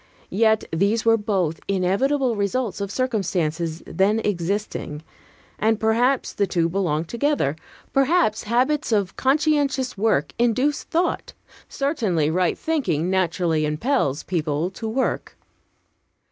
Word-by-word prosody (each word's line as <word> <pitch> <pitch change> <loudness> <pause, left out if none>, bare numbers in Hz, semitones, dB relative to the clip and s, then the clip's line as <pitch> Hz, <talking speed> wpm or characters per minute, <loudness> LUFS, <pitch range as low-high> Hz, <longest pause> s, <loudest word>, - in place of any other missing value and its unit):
Yet 220 +2 +3
these 200 +7 +1
were 225 0 +6
both 195 -7 -1
inevitable 230 +8 +1
results 205 0 -1
of 200 - -2
circumstances 175 -9 -1
then 205 +3 +1
existing; 180 -5 -3 0.6
and 220 0 +2
perhaps 240 +4 +1
the 200 - 0
two 170 -2 +1
belong 170 -4 0
together. 235 - 0 0.4
Perhaps 275 -5 +2
habits 255 +6 +1
of 200 -4 +1
conscientious 275 -4 +1
work 220 +1 +1
induce 250 +5 +1
thought. 345 +2 -1 0.4
Certainly, 215 - 0
right 180 +1 +1
thinking 185 - -1
naturally 170 -3 +1
impels 150 - 0
people 160 0 -1
to 220 +3 -5
work. 260 +4 -2
210 Hz, 115 wpm, -23 LUFS, 175-255 Hz, 0.6 s, were